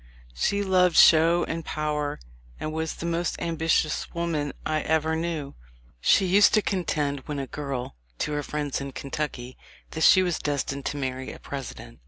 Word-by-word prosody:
She 200 Hz, -, 0 dB
loved 185 Hz, -3 st, +3 dB
show 165 Hz, +2 st, +6 dB
and 165 Hz, 0 st, -3 dB
power, 150 Hz, -2 st, -2 dB, 0.4 s
and 155 Hz, -, -4 dB
was 160 Hz, 0 st, -2 dB
the -, -, -6 dB
most 170 Hz, 0 st, -1 dB
ambi 165 Hz, -1 st, -3 dB
tious 155 Hz, -1 st, +1 dB
woman 160 Hz, -4 st, -1 dB
I 155 Hz, 0 st, 0 dB
ever 160 Hz, +1 st, +1 dB
knew. 160 Hz, -4 st, -3 dB, 0.5 s
She 190 Hz, -, +4 dB
used 200 Hz, +4 st, +5 dB
to 215 Hz, -, +3 dB
contend 150 Hz, -7 st, -1 dB
when 150 Hz, -, -3 dB
a 135 Hz, -, -2 dB
girl, 135 Hz, -, -5 dB, 0.2 s
to -, -, -2 dB
her 145 Hz, 0 st, -1 dB
friends 145 Hz, -2 st, -3 dB
in 140 Hz, -1 st, -6 dB
Kentucky, 135 Hz, -3 st, -5 dB, 0.3 s
that 160 Hz, -, -5 dB
she 185 Hz, +3 st, +7 dB
was 175 Hz, -2 st, -1 dB
destined 140 Hz, -1 st, -2 dB
to 145 Hz, -, -3 dB
marry 130 Hz, -1 st, -3 dB
a -, -, -10 dB
President. 135 Hz, -3 st, -8 dB
155 Hz, 175 wpm, -26 LUFS, 140-170 Hz, 0.5 s, she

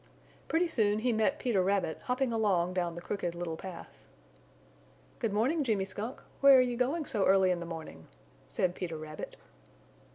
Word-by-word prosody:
Pretty 340 Hz, +2 st, +2 dB
soon 210 Hz, -9 st, +2 dB
he 240 Hz, +2 st, +1 dB
met 220 Hz, +7 st, +1 dB
Peter 235 Hz, -10 st, +1 dB
Rabbit 190 Hz, -3 st, 0 dB
hopping 250 Hz, -1 st, 0 dB
along 190 Hz, -6 st, +1 dB
down 175 Hz, -2 st, -1 dB
the 175 Hz, -, -7 dB
Crooked 175 Hz, -4 st, -3 dB
Little 170 Hz, -2 st, -4 dB
Path. 180 Hz, +1 st, -9 dB, 1.2 s
"Good 230 Hz, -, -1 dB
morning, 260 Hz, +10 st, +1 dB
Jimmy 210 Hz, -7 st, 0 dB
Skunk, 210 Hz, +6 st, -6 dB, 0.2 s
where 275 Hz, -1 st, +8 dB
are -, -, +7 dB
you 250 Hz, -1 st, +2 dB
going 275 Hz, +6 st, 0 dB
so 215 Hz, -8 st, 0 dB
early 190 Hz, -1 st, +5 dB
in 180 Hz, -, 0 dB
the 170 Hz, -, -6 dB
morning?" 160 Hz, -, -8 dB, 0.4 s
said 180 Hz, -1 st, 0 dB
Peter 170 Hz, -3 st, -5 dB
Rabbit. 155 Hz, 0 st, -7 dB
200 Hz, 170 wpm, -31 LUFS, 175-250 Hz, 1.2 s, where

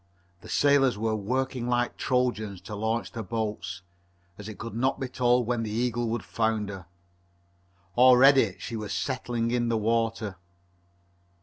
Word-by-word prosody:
The -, -, -13 dB
sailors 140 Hz, -4 st, +3 dB
were 110 Hz, +1 st, 0 dB
working 125 Hz, +3 st, -2 dB
like 120 Hz, 0 st, 0 dB
Trojans 120 Hz, -7 st, -1 dB
to 100 Hz, +3 st, -9 dB
launch 110 Hz, +3 st, -2 dB
the 115 Hz, -, -5 dB
boats, 105 Hz, -3 st, -4 dB, 0.5 s
as 105 Hz, +2 st, -9 dB
it 110 Hz, -, -9 dB
could 115 Hz, -, -7 dB
not 130 Hz, +4 st, 0 dB
be 130 Hz, -, -2 dB
told 125 Hz, -1 st, +2 dB
when 120 Hz, 0 st, -1 dB
the 110 Hz, -, -3 dB
Eagle 120 Hz, +1 st, -1 dB
would 120 Hz, +1 st, -2 dB
founder. 105 Hz, -5 st, -2 dB, 1.1 s
Already 130 Hz, -4 st, +6 dB
she 115 Hz, -, -6 dB
was 105 Hz, -2 st, -4 dB
settling 120 Hz, 0 st, -2 dB
in 120 Hz, -1 st, 0 dB
the 115 Hz, -, +1 dB
water. 115 Hz, -2 st, -1 dB
115 Hz, 145 wpm, -27 LUFS, 110-125 Hz, 1.1 s, Already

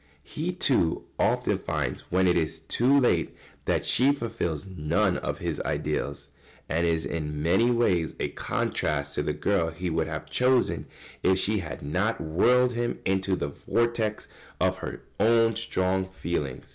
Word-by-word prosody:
] -, -, -35 dB
He, 155 Hz, -, -3 dB
too, 130 Hz, -, +2 dB, 0.2 s
often -, -, +1 dB
finds -, -, -3 dB
when 95 Hz, +1 st, +3 dB
it 90 Hz, -, +3 dB
is 80 Hz, -1 st, 0 dB
too 130 Hz, -, +3 dB
late 125 Hz, -, +1 dB, 0.3 s
that -, -, 0 dB
she 130 Hz, +3 st, +4 dB
fulfils 100 Hz, -, -3 dB
none 90 Hz, +2 st, 0 dB
of -, -, -3 dB
his -, -, -3 dB
ideals, 70 Hz, 0 st, -3 dB, 0.4 s
and 85 Hz, +1 st, +1 dB
is 80 Hz, -1 st, 0 dB
in 75 Hz, -2 st, -3 dB
many 95 Hz, +9 st, +3 dB
ways 95 Hz, -9 st, +1 dB
a -, -, -1 dB
contrast 70 Hz, -1 st, -1 dB
to -, -, +1 dB
the -, -, -1 dB
girl 95 Hz, -5 st, +1 dB
he 90 Hz, +2 st, -4 dB
would 80 Hz, 0 st, 0 dB
have 80 Hz, -1 st, -5 dB
chosen 125 Hz, 0 st, +2 dB, 0.3 s
if 95 Hz, 0 st, +3 dB
she 105 Hz, +2 st, +1 dB
had 70 Hz, -6 st, -7 dB
not 95 Hz, +10 st, 0 dB
whirled 125 Hz, +10 st, +3 dB
him 120 Hz, 0 st, -1 dB
into 95 Hz, 0 st, +1 dB
the 70 Hz, -, -3 dB
vortex 115 Hz, +6 st, -1 dB, 0.3 s
of -, -, +2 dB
her -, -, -7 dB, 0.2 s
own 115 Hz, 0 st, +4 dB
strong 95 Hz, -4 st, 0 dB
feeling. 85 Hz, -8 st, -3 dB
95 Hz, 160 wpm, -27 LUFS, 80-115 Hz, 0.4 s, she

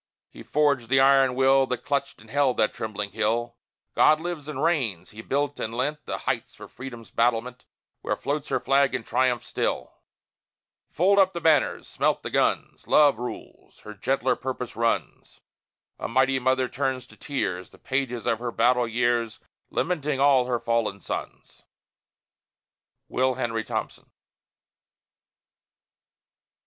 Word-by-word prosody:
He -, -, -12 dB
forged 140 Hz, -6 st, +1 dB
the 135 Hz, +1 st, +4 dB
iron 135 Hz, -1 st, +5 dB
will, 135 Hz, 0 st, +4 dB
That 125 Hz, -, -4 dB
clutched 140 Hz, -1 st, -2 dB
and 110 Hz, 0 st, -16 dB
held 140 Hz, -2 st, +2 dB
that 110 Hz, -, +2 dB
trembling 105 Hz, -2 st, -4 dB
hill! 115 Hz, +3 st, -1 dB, 0.4 s
God 155 Hz, 0 st, +5 dB
lives 165 Hz, -3 st, -5 dB
and 150 Hz, -2 st, -4 dB
reigns! 120 Hz, -, 0 dB
He 110 Hz, -, -9 dB
built 145 Hz, +3 st, -1 dB
and 115 Hz, +1 st, -4 dB
lent 150 Hz, +4 st, -2 dB
The -, -, -3 dB
heights -, -, -3 dB
for -, -, -11 dB
Freedom's 120 Hz, -3 st, -10 dB
battlement, 120 Hz, +1 st, 0 dB, 0.4 s
Where -, -, -1 dB
floats 145 Hz, +1 st, -3 dB
her -, -, +1 dB
flag 135 Hz, 0 st, +2 dB
in 125 Hz, -, -3 dB
triumph 125 Hz, 0 st, +1 dB
still! -, -, -2 dB, 1.0 s
Fold 195 Hz, +5 st, +3 dB
up 190 Hz, -1 st, +4 dB
the 170 Hz, -, -3 dB
banners! 160 Hz, -4 st, +2 dB
Smelt -, -, 0 dB
the -, -, -5 dB
guns! -, -, 0 dB
Love 145 Hz, -6 st, +5 dB
rules. 125 Hz, -, -9 dB
Her 105 Hz, -, -9 dB
gentler 130 Hz, +5 st, 0 dB
purpose 125 Hz, -2 st, -5 dB
runs. 115 Hz, 0 st, -2 dB, 0.6 s
A -, -, -3 dB
mighty 130 Hz, +2 st, +2 dB
mother 130 Hz, 0 st, +1 dB
turns 130 Hz, -1 st, -2 dB
in -, -, -18 dB
tears, 95 Hz, -11 st, -3 dB
The -, -, -18 dB
pages 130 Hz, -3 st, -2 dB
of 115 Hz, -, +1 dB
her 120 Hz, 0 st, -3 dB
battle 120 Hz, +1 st, +2 dB
years, 120 Hz, -1 st, 0 dB, 0.3 s
Lamenting 150 Hz, -5 st, -1 dB
all 135 Hz, -3 st, +5 dB
her 125 Hz, -1 st, 0 dB
fallen 115 Hz, -4 st, -1 dB
sons! -, -, -7 dB, 1.5 s
WILL 130 Hz, 0 st, +1 dB
HENRY 115 Hz, -3 st, -2 dB
THOMPSON. -, -, -5 dB
130 Hz, 145 wpm, -25 LUFS, 115-140 Hz, 1.5 s, iron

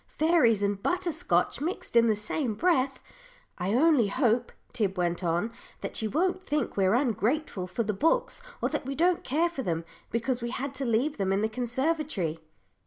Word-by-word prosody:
Fairies 300 Hz, -, +4 dB
and 200 Hz, -1 st, 0 dB
butter 360 Hz, -, 0 dB
scotch 320 Hz, -2 st, 0 dB
mixed 330 Hz, -5 st, -4 dB
in 235 Hz, 0 st, +6 dB
the 220 Hz, -, +3 dB
same 215 Hz, +3 st, -2 dB
breath. 275 Hz, -, +1 dB, 0.6 s
I 190 Hz, +5 st, 0 dB
only 285 Hz, -5 st, +4 dB
hope," 235 Hz, +2 st, +1 dB, 0.2 s
Tib 200 Hz, -5 st, -1 dB
went 175 Hz, 0 st, -1 dB
on, 175 Hz, +6 st, 0 dB, 0.3 s
"that -, -, -5 dB
she 220 Hz, -, -1 dB
won't 360 Hz, -, 0 dB
think 300 Hz, -5 st, -2 dB
we're 195 Hz, +1 st, +3 dB
ungrateful 240 Hz, -, 0 dB
for 185 Hz, +6 st, -2 dB
the 215 Hz, 0 st, -1 dB
books, 475 Hz, -, +1 dB, 0.2 s
or -, -, +2 dB
that -, -, -3 dB
we 275 Hz, -, -3 dB
don't 345 Hz, +3 st, +2 dB
care 315 Hz, +6 st, +1 dB
for 335 Hz, -6 st, -5 dB
them, 165 Hz, -7 st, -2 dB, 0.2 s
because 235 Hz, +2 st, -1 dB
we 235 Hz, -, -3 dB
had 265 Hz, +2 st, -4 dB
to 270 Hz, 0 st, -3 dB
leave 245 Hz, +6 st, +1 dB
them 195 Hz, -2 st, 0 dB
in 195 Hz, +1 st, +1 dB
the 220 Hz, -, +2 dB
conservatory." 250 Hz, -, -1 dB
245 Hz, 185 wpm, -28 LUFS, 205-305 Hz, 0.6 s, in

